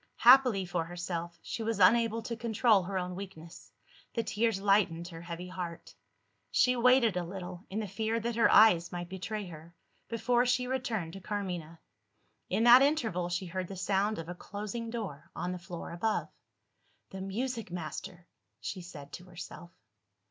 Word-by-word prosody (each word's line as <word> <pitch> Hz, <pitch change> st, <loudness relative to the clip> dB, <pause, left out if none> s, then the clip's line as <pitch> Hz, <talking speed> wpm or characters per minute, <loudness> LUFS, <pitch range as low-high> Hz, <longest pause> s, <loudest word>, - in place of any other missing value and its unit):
Happily 245 Hz, -6 st, +6 dB
for 175 Hz, -1 st, -1 dB
herself, 170 Hz, 0 st, -5 dB
she -, -, -4 dB
was 225 Hz, -2 st, -1 dB
unable 230 Hz, +3 st, +4 dB
to 235 Hz, -, -4 dB
control 225 Hz, -2 st, +3 dB
her 190 Hz, +2 st, -3 dB
own 180 Hz, 0 st, -2 dB
weakness; 180 Hz, -3 st, -10 dB, 0.4 s
the 230 Hz, -, +1 dB
tears 225 Hz, -2 st, 0 dB
lightened 195 Hz, -4 st, +2 dB
her 165 Hz, -2 st, -9 dB
heavy 170 Hz, +1 st, -6 dB
heart. 180 Hz, -2 st, -6 dB, 0.6 s
She 250 Hz, 0 st, +3 dB
waited 245 Hz, -3 st, +4 dB
a 180 Hz, -, 0 dB
little, 180 Hz, +1 st, -7 dB
in 205 Hz, -, -3 dB
the 215 Hz, -, -3 dB
fear 220 Hz, +4 st, -1 dB
that 235 Hz, +1 st, -2 dB
her 230 Hz, -, +4 dB
eyes 180 Hz, -6 st, +6 dB
might 175 Hz, -1 st, -5 dB
betray 200 Hz, +3 st, -4 dB
her, 165 Hz, 0 st, -11 dB, 0.3 s
before 240 Hz, +1 st, +2 dB
she 250 Hz, 0 st, +2 dB
returned 235 Hz, -10 st, -2 dB
to 195 Hz, -, -8 dB
Carmina. 180 Hz, -5 st, -4 dB, 0.7 s
In 205 Hz, +5 st, +1 dB
that 240 Hz, +2 st, +9 dB
interval, 225 Hz, -, +1 dB
she 175 Hz, +2 st, -2 dB
heard 185 Hz, +1 st, -4 dB
the 195 Hz, -, -7 dB
sound 200 Hz, +3 st, +1 dB
of 165 Hz, -, -6 dB
a 175 Hz, -, -4 dB
closing 210 Hz, +5 st, -6 dB
door, 205 Hz, -11 st, -6 dB
on 180 Hz, -, -2 dB
the 180 Hz, -, -5 dB
floor 175 Hz, -1 st, -7 dB
above. 215 Hz, +6 st, -1 dB, 0.8 s
"The 190 Hz, -, -6 dB
music 230 Hz, +3 st, -3 dB
master!" 175 Hz, +1 st, -6 dB, 0.3 s
she 185 Hz, -, -5 dB
said 145 Hz, -5 st, -11 dB
to 175 Hz, -, -8 dB
herself. 175 Hz, -1 st, -9 dB
190 Hz, 170 wpm, -31 LUFS, 175-225 Hz, 0.8 s, that